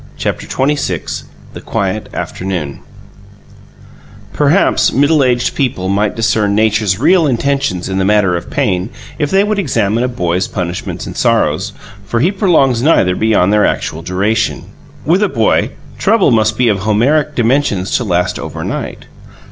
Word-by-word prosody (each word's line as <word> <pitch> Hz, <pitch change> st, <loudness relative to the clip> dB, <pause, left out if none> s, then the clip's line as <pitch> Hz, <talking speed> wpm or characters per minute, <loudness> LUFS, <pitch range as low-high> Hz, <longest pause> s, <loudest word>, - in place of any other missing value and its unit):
CHAPTER -, -, -3 dB
XXVI 145 Hz, +2 st, -2 dB, 0.3 s
THE -, -, -9 dB
QUIET 105 Hz, +2 st, -3 dB
AFTERNOON 90 Hz, -7 st, -4 dB, 1.5 s
Perhaps -, -, +2 dB
middle 145 Hz, +2 st, +3 dB
aged 125 Hz, -1 st, +1 dB
people 115 Hz, -9 st, -1 dB
might 100 Hz, +1 st, 0 dB
discern 105 Hz, -2 st, +1 dB
Nature's 105 Hz, -3 st, +1 dB
real 175 Hz, -, +3 dB
intentions 135 Hz, -7 st, -1 dB
in 95 Hz, 0 st, -2 dB
the -, -, +1 dB
matter 100 Hz, -2 st, +2 dB
of 85 Hz, -, -5 dB
pain 90 Hz, +3 st, -1 dB, 0.3 s
if 145 Hz, -, 0 dB
they 195 Hz, +1 st, +3 dB
would 210 Hz, 0 st, -1 dB
examine 115 Hz, -, 0 dB
a -, -, +1 dB
boy's 90 Hz, -6 st, -1 dB
punishments 90 Hz, -1 st, -4 dB
and -, -, -8 dB
sorrows, -, -, +1 dB, 0.3 s
for 105 Hz, +4 st, -2 dB
he 170 Hz, +10 st, +2 dB
prolongs 160 Hz, -, +2 dB
neither 110 Hz, -, +3 dB
beyond 105 Hz, -3 st, +2 dB
their 105 Hz, -, +3 dB
actual 80 Hz, -, -1 dB
duration. 100 Hz, +5 st, -1 dB, 0.4 s
With 175 Hz, +7 st, +2 dB
a 210 Hz, -, +2 dB
boy, 115 Hz, -7 st, +1 dB, 0.3 s
trouble 210 Hz, -, +3 dB
must 110 Hz, -1 st, +2 dB
be 125 Hz, -, +2 dB
of 105 Hz, -3 st, +1 dB
Homeric 130 Hz, +9 st, +1 dB
dimensions 115 Hz, -6 st, +1 dB
to 125 Hz, -, -2 dB
last 90 Hz, -3 st, -1 dB
overnight. -, -, -5 dB
110 Hz, 150 wpm, -14 LUFS, 95-140 Hz, 1.5 s, middle